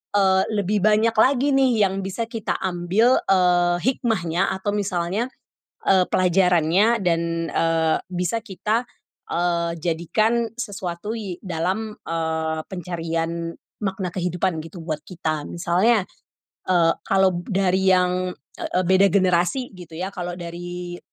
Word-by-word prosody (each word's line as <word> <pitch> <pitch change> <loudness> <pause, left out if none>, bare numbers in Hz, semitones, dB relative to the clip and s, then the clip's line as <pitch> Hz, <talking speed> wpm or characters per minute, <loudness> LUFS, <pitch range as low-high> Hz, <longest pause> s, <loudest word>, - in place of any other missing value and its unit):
eee, 190 -1 +4 0.2
lebih 205 +3 +1
banyak 215 +2 +3
lagi 265 +5 +3
nih 255 -5 +4
yang 195 +1 -4
bisa 210 +4 -3
kita 225 -3 -4
ambil, 185 +7 +2
eee, 180 -2 +3
hikmahnya 190 -10 0
atau 205 +1 -1
misalnya, 195 +3 -1 0.6
eee, 190 -1 +5
pelajarannya 180 +4 +3
dan, 170 -2 +2 0.3
eee, 165 -1 +2
bisa 180 +5 -1
kita, 215 +2 -1 0.5
eee, 170 -1 0
jadikan 215 +8 0
sesuatu 200 -3 -4
ye 200 -6 -5
dalam, 190 +5 -2
eee, 160 -1 -2
pencarian 165 -2 -3 0.3
makna 190 -2 -2
kehidupan 180 -1 -1
gitu 170 0 -10
buat 155 -2 -3
kita. 155 -4 -3
Misalnya. 185 +5 +2 0.6
Eee, 170 -3 +3
kalau 185 -2 +2
dari 190 -1 +2
yang, 180 0 +1 0.2
eee, - - -4
eee, 185 - +3
beda 190 +1 +6
generasi 185 +6 +2
gitu 170 -2 -12
ya 185 +4 -3
kalau 175 -2 -5
dari 175 0 -6
180 Hz, 125 wpm, -23 LUFS, 170-205 Hz, 0.6 s, beda